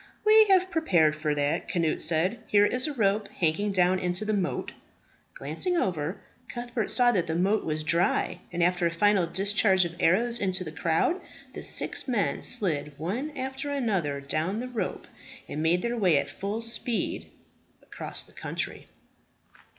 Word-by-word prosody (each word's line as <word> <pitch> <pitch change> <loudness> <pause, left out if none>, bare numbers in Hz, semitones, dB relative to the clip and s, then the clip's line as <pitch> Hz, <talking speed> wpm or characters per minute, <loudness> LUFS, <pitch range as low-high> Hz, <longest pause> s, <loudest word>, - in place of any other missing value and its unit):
"We 435 0 +7
have 375 -2 +3
prepared 170 - +3
for 155 -1 -1
that," 145 0 -1
Cnut 165 -3 0
said. 170 +8 +1
"Here 205 0 +4
is 250 +6 0
a 300 - -3
rope 205 -2 +1
hanging 180 +5 -1
down 185 -1 +2
into 180 +3 -1
the 215 - 0
moat." 190 -3 -2 0.6
Glancing 360 -1 -1
over, 175 - -1 0.3
Cuthbert 240 -3 -3
saw 245 -1 +4
that 185 -7 0
the 160 - -2
moat 195 +5 +1
was 155 0 -2
dry; 170 +3 +1
and 175 -1 0
after 180 0 +2
a - - -2
final 190 +1 +2
discharge 190 +1 +2
of 170 0 -6
arrows 235 +8 +2
into 185 -2 0
the 155 - -7
crowd, 165 - 0 0.3
the - - -7
six - - -1
men 235 -6 0
slid 150 - +2
one 210 - -3
after 265 +2 -4
another 195 - -1
down 155 +9 -2
the 250 - -4
rope 245 -3 -4 0.4
and 150 - -4
made 170 +3 +2
their 235 0 -1
way 180 -8 +3
at 140 - -2
full 205 +4 -4
speed 230 0 -2 0.5
across - - -5
the - - -16
country. - - -5
190 Hz, 165 wpm, -27 LUFS, 165-235 Hz, 0.6 s, We